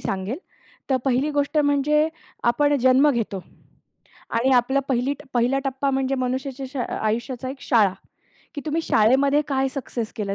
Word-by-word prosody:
सांगेल. 195 +7 -3 0.5
तर 265 - +4
पहिली 270 +2 +1
गोष्ट 290 +1 0
म्हणजे 295 +1 +3 0.4
आपण 290 +5 +3
जन्म 260 +4 +5
घेतो 220 -7 -2 0.9
आणि 235 +3 +2
आपलं 255 +3 +3
पहिली 260 +2 +1 0.2
पहिला 245 +3 +2
टप्पा 270 +1 -1
म्हणजे 270 0 0
मनुष्याच्या 260 +1 -3
श 280 - -10 0.2
आयुष्याचा 240 +4 -2
एक 270 0 -9
शाळा, 215 -6 +3 0.6
की 290 - -4
तुम्ही 310 +2 0
शाळेमध्ये 275 +5 +3
काय 270 -1 +1
सक्सेस 240 -4 -4
केलं. 200 -2 -2
265 Hz, 145 wpm, -23 LUFS, 240-280 Hz, 0.9 s, जन्म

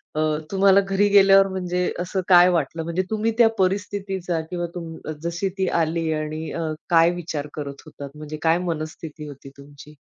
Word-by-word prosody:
अ, 155 - -1 0.3
तुम्हाला 195 0 +5
घरी 195 +1 +1
गेल्यावर 195 -1 +6
म्हणजे 180 -1 -2
असं 185 +2 -2
काय 180 -1 +7
वाटलं? 165 -1 -1
म्हणजे 170 +3 -2
तुम्ही 220 +1 0
त्या 235 -2 +6
परिस्थितीचा 190 -2 -1
किंवा 175 -1 -3
तुम 165 -2 -6 0.3
जशी 170 +3 -2
ती 190 - 0
आली 160 0 -1
आणि 155 +1 -4
अ, - - -4 0.3
काय 165 0 +5
विचार 155 -4 -5
करत 140 -2 -7
होतात? 145 -2 -9
म्हणजे 155 0 -7
काय 165 +1 +4
मनस्थिती 155 -1 -6
होती 140 -1 -11
तुमची? 145 +1 -14
170 Hz, 165 wpm, -23 LUFS, 155-190 Hz, 0.3 s, काय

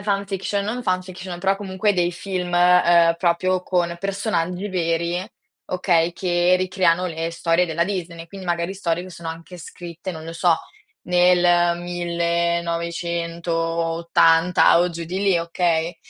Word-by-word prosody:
ehm, - - -9
fan-fiction, 200 0 -2
non 235 +4 -3
fan-fiction, 185 -2 -3
però 195 +1 +1
comunque 200 +1 -1
dei 175 -2 0
film, 180 0 -4
ehm, 175 -1 +5
proprio 180 +1 +1
con 175 -2 -1
personaggi 195 -1 -2
veri, 170 0 -1 0.4
okay, 175 -2 +1
che 175 0 +2
ricreano 185 -1 +1
le 165 -1 -3
storie 170 +1 +1
della 170 +1 0
Disney, 170 -4 -5
quindi 190 +1 -10
magari 170 +2 -1
storie 175 -3 -2
che 185 - -10
sono 170 -1 -8
anche 165 +2 -8
scritte, 175 +2 -8
non 160 -1 -9
lo 165 - -7
so, 170 0 +2 0.5
nel 175 -1 +4
1980 170 -1 +1
o 180 +1 +1
giù 170 0 -6
di 180 +3 -4
lì, 195 -3 +3
okay? 165 0 -1
175 Hz, 140 wpm, -22 LUFS, 170-185 Hz, 0.5 s, ehm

